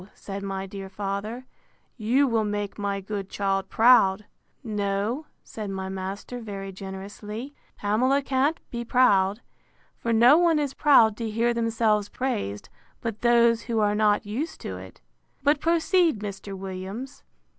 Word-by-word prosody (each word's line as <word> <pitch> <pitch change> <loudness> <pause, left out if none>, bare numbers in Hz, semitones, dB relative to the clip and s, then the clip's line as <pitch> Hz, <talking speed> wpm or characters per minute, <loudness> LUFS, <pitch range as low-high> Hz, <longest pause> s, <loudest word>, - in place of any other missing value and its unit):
said 200 0 -7
my 195 -1 -4
dear 195 0 -8
father, 200 +5 -4 0.5
you 250 +5 +2
will 225 -3 +1
make 205 -1 -3
my 200 -1 -1
good 195 0 -5
child 195 -1 -1
proud. 215 -4 +5 0.4
No, 210 +5 -2 0.2
said 215 -2 -7
my 190 -1 -4
master 195 +5 -5
very 200 -4 -6
generously, 200 +6 -7 0.2
Pamela 255 +7 +2
can't 275 +4 +1
be 235 -1 -3
proud. 210 -4 +3 0.6
For 230 - -2
no 240 +7 +6
one 340 -2 +4
is 290 -3 -1
proud 230 -8 +5
to 230 -2 -3
hear 230 +2 +1
themselves 225 -3 +1
praised, 105 - -3 0.3
but 225 -2 -5
those 235 -1 +4
who 230 - 0
are 205 -1 +2
not 210 +1 +2
used 250 +11 -4
to - - -5
it.—But 285 +1 -4
proceed, 335 - +2
Mr. 200 -1 -6
Williams. 195 +7 -7
215 Hz, 140 wpm, -26 LUFS, 195-245 Hz, 0.6 s, no